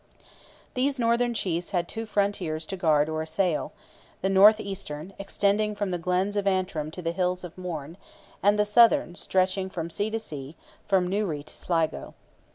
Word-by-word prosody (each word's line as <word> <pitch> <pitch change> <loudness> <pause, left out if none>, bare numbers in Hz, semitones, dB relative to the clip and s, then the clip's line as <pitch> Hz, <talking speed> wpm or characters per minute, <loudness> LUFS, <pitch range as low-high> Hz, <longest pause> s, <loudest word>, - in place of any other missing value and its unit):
These 270 +2 0
northern 235 0 +1
chiefs 175 -4 -1
had 175 -3 -1
two 225 +3 -5
frontiers 195 -7 -1
to 190 - -5
guard 155 -4 +3
or 155 0 -2
to - - -1
assail: 160 +1 -1 0.5
the 190 - +1
north 205 +3 +7
eastern, 195 -4 -6
extending 205 +2 0
from 205 -2 -2
the 175 - -2
glens 185 +4 0
of 200 -1 0
Antrim 185 -5 0
to 175 +3 -8
the 165 - 0
hills 180 +1 -1
of 175 -2 -8
Mourne, 165 -3 -6 0.4
and 205 +1 +4
the 210 - +3
southern 230 +1 +5
stretching 185 +1 0
from 170 -3 -5
sea 205 +5 -1
to 225 - -1
sea, 150 -8 -7 0.3
from 190 -2 +3
Newry 185 -7 -1
to 155 - -8
Sligo. 165 -3 -2
185 Hz, 175 wpm, -26 LUFS, 165-205 Hz, 0.5 s, north